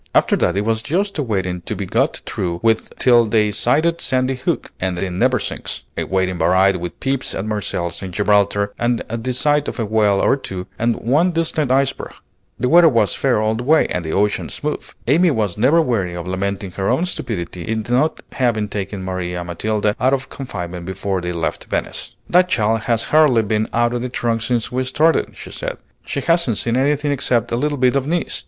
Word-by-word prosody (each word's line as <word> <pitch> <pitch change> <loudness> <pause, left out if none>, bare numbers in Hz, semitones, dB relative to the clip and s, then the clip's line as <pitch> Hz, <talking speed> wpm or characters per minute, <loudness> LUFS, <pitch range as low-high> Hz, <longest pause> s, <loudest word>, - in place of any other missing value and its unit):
After - - +4
that 90 +2 +1
it 100 - 0
was 110 0 0
just 185 - -1
a - - +2
waiting 95 -7 -2
to - - -5
be - - -4
got - - 0
through 90 -5 -3
with 115 -1 +1
till 120 -2 +5
they 105 -1 +2
sighted 155 +10 +1
Sandy 130 0 0
Hook 130 - -2
and 90 -1 -2
the 95 +1 -2
Neversinks, 120 +6 -1
a - - -2
waiting 95 -2 -1
varied 95 +3 +4
with 90 0 -6
peeps 135 0 -1
at 95 - -3
Marseilles 90 -5 -2
and 95 -2 -6
Gibraltar 100 +1 +2
and 120 0 0
the 115 +3 -3
sight 145 +3 +1
of - - -4
a 115 - 0
whale 105 -2 +2
or - - +3
two 95 -8 -6
and 115 0 +2
one 150 +10 +2
distant 160 -4 0
iceberg. 135 +1 0 0.5
The 125 - +1
weather 170 +3 +7
was 115 -6 +2
fair 130 -5 +1
all 110 0 +1
the 115 +2 -4
way, 155 +5 +4
and 90 - -1
the 80 - -4
ocean 105 +3 0
smooth. 150 0 -4 0.2
Amy 170 +8 +4
was 105 - 0
never 145 +9 +4
weary 100 - -1
of 85 -1 -5
lamenting 95 +1 -3
her 95 +2 -2
own 130 +9 +2
stupidity 90 - -4
in 110 -1 -2
not 130 +6 +1
having 110 -5 0
taken 100 -1 -4
Maria 90 -1 -3
Matilda 105 +4 -1
out 130 +2 +3
of 135 0 -7
confinement 90 -9 -6
before 95 0 -2
they 90 0 -3
left 85 -1 -3
Venice. - - -4
"That 180 +1 +4
child 110 -5 +2
has 115 -1 +2
hardly 145 -7 +5
been 110 +1 0
out 120 0 +1
of 120 - -2
the 125 - -3
trunk 115 -2 -1
since 120 0 -1
we 130 +1 0
started," 155 +5 +1
she - - -9
said. - - -4 0.3
"She - - -3
hasn't 165 - +1
seen 115 0 -1
anything 145 +2 +1
except 125 -5 0
a - - +1
little 145 +4 -1
bit 130 0 +3
of 140 0 0
Nice. 170 +2 -1
115 Hz, 205 wpm, -19 LUFS, 95-135 Hz, 0.5 s, weather